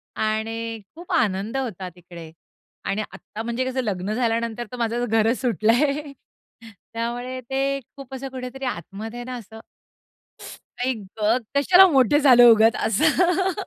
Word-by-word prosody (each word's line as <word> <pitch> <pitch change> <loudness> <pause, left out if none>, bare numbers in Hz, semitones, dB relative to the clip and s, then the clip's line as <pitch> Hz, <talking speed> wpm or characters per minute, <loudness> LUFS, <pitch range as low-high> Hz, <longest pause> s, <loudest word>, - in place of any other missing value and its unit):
आणि 225 +1 -2
खूप 345 +3 -10
आनंद 215 - 0
होता 200 -8 -4
तिकडे 170 -2 -12 0.5
आणि 200 +2 -1
आत्ता 220 - -9
म्हणजे 235 +2 -2
कसं 260 0 -1
लग्न 200 -1 -2
झाल्यानंतर 230 0 -1
तर 250 - -7
माझं 235 +1 -1
घरच 225 +2 +2
सुटलंय, 265 - +1 0.8
त्यामुळे 240 +3 -4
ते 270 +2 -1 0.2
खूप 270 -1 -11
असं 270 +1 -6
कुठेतरी 260 +1 -6
आतमध्ये 220 +2 -6
आहे - - -5
ना 255 0 -5
असं. 220 0 -12 1.3
आई 260 - +1 0.3
गं, 220 +4 +3 0.2
कशाला 365 +7 +7
मोठे 270 +2 +4
झालो 245 -4 +8
उगाच 225 +1 +4
असं. 350 - +2
240 Hz, 135 wpm, -23 LUFS, 220-265 Hz, 1.3 s, झालो